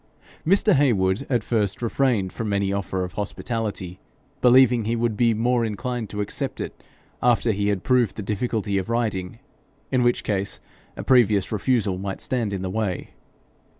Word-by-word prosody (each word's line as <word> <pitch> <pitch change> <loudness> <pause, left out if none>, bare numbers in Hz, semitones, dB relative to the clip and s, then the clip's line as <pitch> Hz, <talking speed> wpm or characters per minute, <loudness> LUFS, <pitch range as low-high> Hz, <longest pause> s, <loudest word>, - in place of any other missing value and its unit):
Mr. 195 +4 +4
Heywood 110 -4 +2
at 120 -5 +1
first 105 -5 0
refrained 115 -5 0
from 110 -2 -3
any 100 -1 0
offer 95 -1 -2
of 90 0 -6
hospitality, 105 -3 -4 0.4
believing 125 -2 +5
he 115 +2 0
would 115 -1 0
be 115 0 +3
more 120 +2 +1
inclined 115 +1 -3
to 105 - -3
accept 100 - -3
it - - -6 0.4
after 120 -1 +3
he 100 0 -1
had 100 -3 0
proved 125 -5 +2
the 105 - -5
difficulty 105 -1 -1
of 95 - -5
riding, 110 -4 -1 0.5
in 130 -2 +2
which 120 0 +2
case 100 -1 -1 0.4
a - - -5
previous 110 -7 +3
refusal 105 -3 0
might 95 0 -4
stand 120 -6 -2
in 95 -2 -3
the 95 - -2
way. 105 -4 -2
110 Hz, 165 wpm, -24 LUFS, 100-120 Hz, 0.5 s, believing